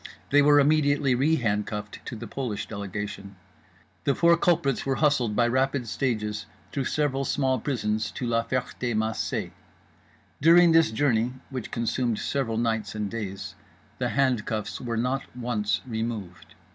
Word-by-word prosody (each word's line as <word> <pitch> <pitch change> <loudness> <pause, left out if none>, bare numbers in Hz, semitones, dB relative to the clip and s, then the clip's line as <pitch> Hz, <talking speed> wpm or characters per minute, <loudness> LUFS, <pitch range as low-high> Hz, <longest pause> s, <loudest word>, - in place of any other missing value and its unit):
They 145 +1 +6
were 145 0 +6
immediately 145 -2 +3
re 140 +6 +3
handcuffed 105 -4 -2
to - - -5
the 115 +2 -7
Polish 115 -2 -4
delegation. 100 -1 -6 0.7
The 140 - +2
four 170 0 +5
culprits 165 -6 +1
were 135 0 0
hustled, 130 -8 +2
by 120 +1 +3
rapid 130 0 0
stages, 105 -4 -2 0.2
through 135 -2 -2
several 140 -2 0
small 130 -2 +1
prisons 110 -4 -1
to 125 - -4
La 115 -1 +1
Ferté 125 -1 -2
Macé. 110 +1 -1 0.9
During 170 +2 +7
this 165 0 +5
journey 120 0 +1 0.2
(which 130 -4 -5
consumed 115 0 -1
several 120 -4 -1
nights 115 -2 -1
and 105 -2 -3
days) 95 -4 -5 0.5
the 125 -1 0
handcuffs 115 -5 0
were 120 -2 -3
not 125 +4 0 0.2
once 110 -4 -1
removed. 110 -6 -5
120 Hz, 145 wpm, -26 LUFS, 110-135 Hz, 0.9 s, During